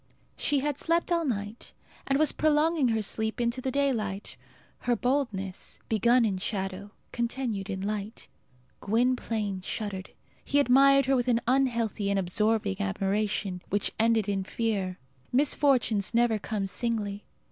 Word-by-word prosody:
She 285 -2 0
had 290 0 -2
slept 335 +2 +1
all 340 -1 +2
night, 210 -3 -4 0.3
and 275 - +2
was 310 +1 +3
prolonging 310 -1 +2
her 225 -2 0
sleep 220 +3 -1
into 240 +1 0
the 260 - -2
daylight; 235 -8 -1 0.4
her 245 0 +1
boldness, 235 -8 -2
begun 235 +3 +4
in 195 -4 -1
shadow, 195 0 -3 0.2
continued 235 -4 -2
in 190 -1 -3
light. 210 +2 -4 0.5
Gwynplaine 225 -3 0
shuddered. 195 -1 -4 0.3
He 285 - +1
admired 275 +1 +5
her 270 0 +3
with 245 -1 0
an 235 -2 +3
unhealthy 235 -5 +1
and 200 - +1
absorbing 205 +1 0
admiration, 195 -1 -1
which 205 +1 0
ended 225 -2 +3
in 195 -1 -1
fear. 195 -3 -2 0.3
Misfortunes 250 -6 +2
never 235 -2 +3
come 205 -1 -3
singly. 205 -1 -3
225 Hz, 135 wpm, -28 LUFS, 200-255 Hz, 0.5 s, admired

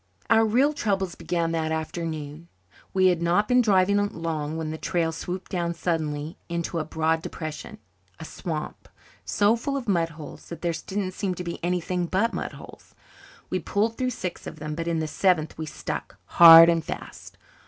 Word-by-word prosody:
Our 225 - +6
real 255 +7 +3
troubles 195 - -1
began 170 -2 -2
that 160 -1 -1
afternoon. 160 -1 -4 0.4
We 185 -1 +4
had 175 -2 0
not 175 +5 +2
been 250 +1 +4
driving 200 -3 +3
long 160 -4 -4
when 160 -1 -3
the 160 - -6
trail 170 -3 0
swooped 180 +3 -6
down 170 -2 -1
suddenly 155 -2 -3
into 170 0 -2
a - - -1
broad 160 +1 0
depression 155 -1 -7 0.4
a - - -7
swamp, 155 -2 -6 0.4
so 205 +2 +3
full 275 +4 -3
of 255 -4 -6
mud 170 -5 +1
holes 155 -2 -11
that 170 - -8
there 170 -1 0
didn't 195 -1 -2
seem 185 -1 -3
to 180 - -5
be 170 -1 -6
anything 180 0 -1
but 200 +7 +1
mud - - -4
holes. - - -14 0.6
We - - 0
pulled 220 +2 0
through 255 +1 -1
six 185 -7 -5
of - - -8
them 155 0 -5
but 165 +2 -4
in 170 -1 0
the 160 -1 -1
seventh 165 -1 +1
we 160 0 -5
stuck, - - -6
hard 165 -1 +10
and 165 -1 +2
fast. - - -8
170 Hz, 185 wpm, -25 LUFS, 160-190 Hz, 0.6 s, hard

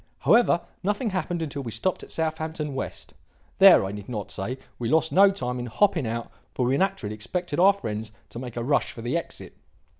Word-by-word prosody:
"However, 230 -7 +4 0.2
nothing 210 +4 -1
happened 175 -2 -2
until 145 -2 -4
we 120 - -5
stopped 145 - -1
at - - -11
Southampton 160 -2 -3
West. 135 - -6 0.5
There, - - +8
I 95 - -4
need 105 +1 -8
not 105 -5 -5
say, 115 +7 -4 0.2
we 115 -2 -2
lost 160 +2 +2
no 195 +2 +7
time 125 -10 -3
in 120 - -4
hopping 165 - +2
out, 115 +1 -4 0.2
for 125 - +1
we 130 +2 +2
naturally 190 - 0
expected 145 - -3
our 190 +3 +7
friends 110 - -5 0.2
to 115 - -7
make 125 -2 -7
a 120 - -1
rush 140 +3 +1
for 115 - -9
the 120 +6 -1
exit. 170 - -5
140 Hz, 205 wpm, -25 LUFS, 115-175 Hz, 0.5 s, There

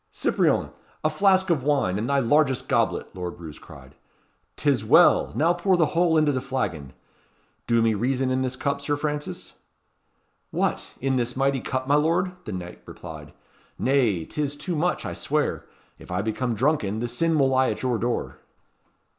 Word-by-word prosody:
"Cyprien! - - +1 0.3
a 155 - +2
flask 190 +2 +3
of 155 -5 +1
wine, 130 -9 +1
and 115 - -3
thy 140 - +2
largest 135 +1 +2
goblet," - - 0
Lord 90 -2 -6
Roos 80 -3 -9
cried. - - -14 0.6
"'Tis 140 -7 +1
well! 145 +10 +5
Now 165 +3 +3
pour 180 +1 +1
the 165 - +4
whole 170 -1 +3
into 155 -1 +3
the 130 -2 -2
flagon. 90 - -3 0.7
Do 115 -1 +3
me 115 -1 +3
reason 130 +4 0
in 130 0 +1
this 130 0 -2
cup, 140 +1 -2
Sir 145 +1 -1
Francis?" 150 0 -4 1.0
"What! - - -2
in 135 0 +1
this 120 +1 -2
mighty 135 -1 +1
cup, 130 +1 -3
my 145 - +2
lord?" 165 +5 +2
the 110 - -5
knight 90 -2 -7
replied. 80 -3 -10 0.5
"Nay, 120 - +1
'tis 145 - -3
too 165 +4 -4
much, 175 +4 0
I - - -4
swear. - - -2 0.3
If - - -14
I 90 +2 -1
become 115 +2 -2
drunken, 110 -4 0
the 120 - -2
sin 160 +7 0
will 135 -2 +3
lie 130 0 +3
at - - -4
your 125 -3 0
door." 120 +1 -2
130 Hz, 175 wpm, -25 LUFS, 115-150 Hz, 1.0 s, well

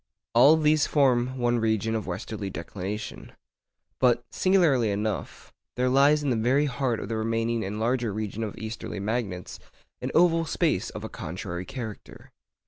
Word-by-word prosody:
All 135 +7 +7
these 155 -1 +3
form 130 -3 +2
one 120 -1 +1
region 110 0 0
of 110 -4 -2
westerly 100 +2 -4
declination; 95 +5 -6 0.7
but, 120 -2 +3
singularly 165 - +3
enough, 105 0 -3 0.2
there 125 +1 +1
lies 140 +3 +4
in 140 - +1
the - - +2
very 125 +6 +2
heart 130 -4 -1
of - - -5
the 115 - -2
remaining 115 +1 0
and 100 +3 -4
larger 120 0 0
region 110 +1 -4
of 105 - -5
easterly 110 -2 -6
magnets 100 -4 -3 0.4
an - - -2
oval 165 -1 +4
space - - 0
of - - -8
a - - -5
contrary 90 +2 -6
character. 120 -6 -8
115 Hz, 155 wpm, -26 LUFS, 105-130 Hz, 0.7 s, All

